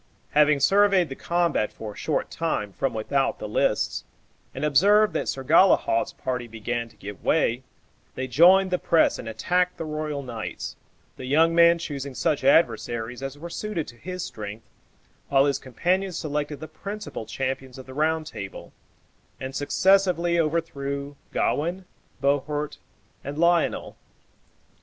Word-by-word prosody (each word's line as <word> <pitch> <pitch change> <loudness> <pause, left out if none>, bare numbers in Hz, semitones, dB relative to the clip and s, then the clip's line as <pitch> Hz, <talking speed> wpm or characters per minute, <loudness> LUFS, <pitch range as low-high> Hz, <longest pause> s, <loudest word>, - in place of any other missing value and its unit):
Having 150 -1 +4
surveyed 195 -3 +4
the 135 - -6
combat 170 -11 0
for 105 -2 -8
a - - -19
short - - -2
time 105 -2 -2
from 135 - -1
without 135 +5 0
the - - -6
lists, - - 0 0.5
and 135 - -3
observed 205 +9 +4
that - - -2
Sir 135 - -3
Galehaut's 160 -6 +4
party 125 -2 -4
began 115 +1 -4
to - - -22
give 100 0 -9
way, 130 -6 +2 0.5
they 130 - -3
joined 180 +9 +5
the 180 - +1
press 165 - +3
and 115 - -6
attacked 180 +11 0
the 165 - -4
royal 150 -2 -3
knights, 115 -4 -6 0.4
the 130 - -7
young 160 +5 +4
man 170 0 +6
choosing 140 -5 -5
such 150 -2 0
adversaries 120 -4 +2
as 135 +1 -5
were 165 +4 -7
suited 210 -7 -3
to 120 - -13
his 180 +8 -6
strength, 105 +1 -7 0.6
while 135 0 +4
his 140 -1 +1
companion 185 +9 -1
selected 150 -3 -3
the 155 - -6
principal 200 - -7
champions 135 -1 -4
of 130 - -10
the 130 - -10
Round 155 +2 0
Table, 105 -9 -8 0.7
and 130 0 -5
successively 175 +3 +2
overthrew 145 -3 -2 0.2
Gawain, 175 +5 -1 0.3
Bohort, 145 +2 -1 0.4
and 140 +2 -6
Lionel. 170 +1 +1
145 Hz, 145 wpm, -25 LUFS, 130-170 Hz, 0.7 s, man